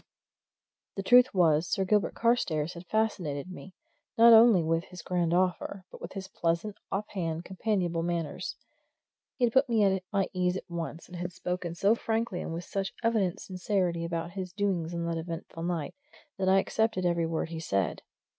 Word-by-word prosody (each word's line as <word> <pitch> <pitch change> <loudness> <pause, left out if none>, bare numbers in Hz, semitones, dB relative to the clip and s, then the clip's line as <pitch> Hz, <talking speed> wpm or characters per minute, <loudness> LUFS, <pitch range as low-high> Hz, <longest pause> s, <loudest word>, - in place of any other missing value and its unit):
The 195 - -3
truth 250 +4 +6
was, 165 -3 +3
Sir 190 - +1
Gilbert 210 +1 +1
Carstairs 175 -10 +1
had 170 +1 -11
fascinated 185 -8 -1
me, 185 0 -11 0.4
not 230 0 +9
only 220 -6 +7
with 165 +2 0
his 180 -1 -11
grand 175 -2 0
offer, 185 +1 0
but - - -12
with - - -7
his 190 -1 -6
pleasant, 170 +3 -1 0.2
off 205 +2 -2
hand, 165 -3 -3
companionable 185 -4 -1
manners. 170 -2 -3 0.8
He 255 - -1
had 230 - -1
put 265 0 +4
me 225 -3 +3
at 190 -1 +2
my 200 -2 +1
ease 180 0 +1
at - - -9
once; 165 -2 -5
he 180 - -11
had 175 +1 -4
spoken 180 -1 -4
so 200 +5 +4
frankly 225 -4 -1
and - - -5
with 170 +1 -5
such 195 -1 -3
evident 215 -6 +1
sincerity 180 -2 -1
about 170 0 -3
his 185 -1 -5
doings 190 -5 -1
on 170 0 -2
that 165 -1 -2
eventful 165 0 -7
night, 170 -3 -2 0.5
that 190 0 +2
I 190 - +6
accepted 220 -1 +1
every 170 -1 +1
word 160 0 -2
he 165 -1 -5
said. 100 - -1
180 Hz, 185 wpm, -29 LUFS, 170-200 Hz, 0.8 s, not